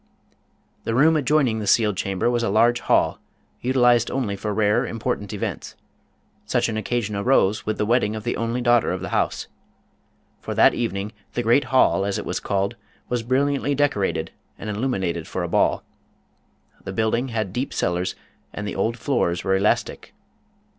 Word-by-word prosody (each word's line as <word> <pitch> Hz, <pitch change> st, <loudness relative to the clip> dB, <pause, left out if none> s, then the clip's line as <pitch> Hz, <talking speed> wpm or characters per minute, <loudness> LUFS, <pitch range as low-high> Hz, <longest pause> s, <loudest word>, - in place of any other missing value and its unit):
The 115 Hz, -, -2 dB
room 155 Hz, +5 st, +5 dB
adjoining 135 Hz, -5 st, +2 dB
the 105 Hz, -, -4 dB
sealed 105 Hz, -1 st, +3 dB
chamber 95 Hz, +2 st, -1 dB
was 120 Hz, -1 st, +1 dB
a 115 Hz, -, 0 dB
large 120 Hz, +1 st, +3 dB
hall, -, -, +1 dB, 0.4 s
utilized 125 Hz, -2 st, +3 dB
only 125 Hz, -7 st, -2 dB
for 105 Hz, +2 st, -4 dB
rare 105 Hz, 0 st, +2 dB
important 115 Hz, -3 st, -3 dB
events. 105 Hz, -, -5 dB, 0.7 s
Such -, -, +1 dB
an 110 Hz, -, -3 dB
occasion 110 Hz, -1 st, -2 dB
arose 105 Hz, -1 st, +2 dB
with 110 Hz, -, -1 dB
the 105 Hz, -, 0 dB
wedding 110 Hz, -2 st, +1 dB
of 110 Hz, -, -6 dB
the -, -, -1 dB
only 115 Hz, +2 st, -2 dB
daughter 120 Hz, -1 st, +3 dB
of 90 Hz, -, -4 dB
the -, -, -5 dB
house. -, -, 0 dB, 0.9 s
For -, -, -5 dB
that -, -, +6 dB
evening 105 Hz, -3 st, -3 dB, 0.2 s
the 120 Hz, -, -1 dB
great 120 Hz, +5 st, +3 dB
hall, 130 Hz, -6 st, +3 dB
as 100 Hz, +1 st, -1 dB
it -, -, -5 dB
was -, -, -2 dB
called, 100 Hz, 0 st, -1 dB, 0.3 s
was 125 Hz, -1 st, 0 dB
bril 130 Hz, +4 st, +1 dB
liantly 145 Hz, 0 st, 0 dB
decorated 140 Hz, -9 st, 0 dB, 0.3 s
and 105 Hz, -, -5 dB
illuminated 95 Hz, -8 st, -2 dB
for -, -, -3 dB
a -, -, -2 dB
ball. -, -, +1 dB, 1.0 s
The 95 Hz, -, -6 dB
building 115 Hz, +4 st, 0 dB
had 110 Hz, -6 st, -3 dB
deep 125 Hz, +4 st, -2 dB
cellars 90 Hz, +1 st, -1 dB, 0.4 s
and 105 Hz, -, -5 dB
the -, -, -4 dB
old 115 Hz, +5 st, -1 dB
floors 115 Hz, -9 st, 0 dB
were 95 Hz, -, +2 dB
elastic. 100 Hz, +2 st, -1 dB
110 Hz, 175 wpm, -23 LUFS, 100-125 Hz, 1.0 s, that